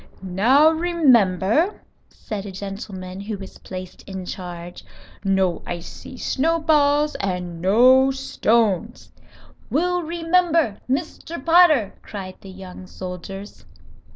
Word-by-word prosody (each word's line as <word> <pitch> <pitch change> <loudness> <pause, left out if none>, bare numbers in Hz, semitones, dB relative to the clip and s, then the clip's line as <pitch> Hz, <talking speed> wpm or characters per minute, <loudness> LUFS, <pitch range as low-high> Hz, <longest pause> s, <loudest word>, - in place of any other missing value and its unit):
"Now, 240 - +4
remember," 300 - +2 0.3
said 205 -2 -7
a - - -6
gentleman 195 -1 -7
who 205 +1 -5
was 195 -1 -11
placed 185 -1 -8
in 190 -1 -6
charge. 175 -2 -8 0.4
"No 190 -3 +1
icy 175 +8 -8
snowballs 300 0 +2
and 180 -3 -3
no 255 +8 +5
stones." 230 -5 0 0.6
"We'll 355 +4 +1
remember, 330 - +1
Mr. 315 +1 -4
Potter," 325 - +5
cried 190 -3 -8
the 195 - -11
young 185 -1 -10
soldiers. 190 +2 -8
210 Hz, 100 wpm, -22 LUFS, 185-300 Hz, 0.6 s, no